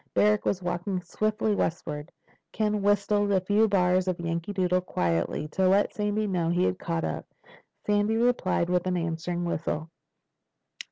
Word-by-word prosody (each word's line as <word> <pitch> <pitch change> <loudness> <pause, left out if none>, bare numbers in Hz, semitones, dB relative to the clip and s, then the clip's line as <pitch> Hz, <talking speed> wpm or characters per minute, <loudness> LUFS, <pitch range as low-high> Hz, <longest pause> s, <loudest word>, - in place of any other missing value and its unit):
Barrack 210 0 +3
was 185 -2 0
walking 180 +2 -2
swiftly 215 +1 0
eastward. 150 -2 -4 0.4
Ken 210 -1 0
whistled 205 0 +2
a 195 - +4
few 205 +4 +3
bars 185 -2 +2
of 180 -2 -1
"Yankee 170 +2 -3
Doodle," 185 -2 +1
quietly, 85 - -1
to 185 +3 +2
let 200 +2 +3
Sandy 210 +1 -1
know 180 -5 0
he 175 +1 +2
had 185 - 0
caught 165 -2 -2
up. - - -4 0.6
Sandy 210 +2 +2
replied 235 -7 +1
with 180 0 0
an 180 -1 0
answering 170 +1 -2
whistle. 160 -1 -3
185 Hz, 155 wpm, -27 LUFS, 170-205 Hz, 0.6 s, a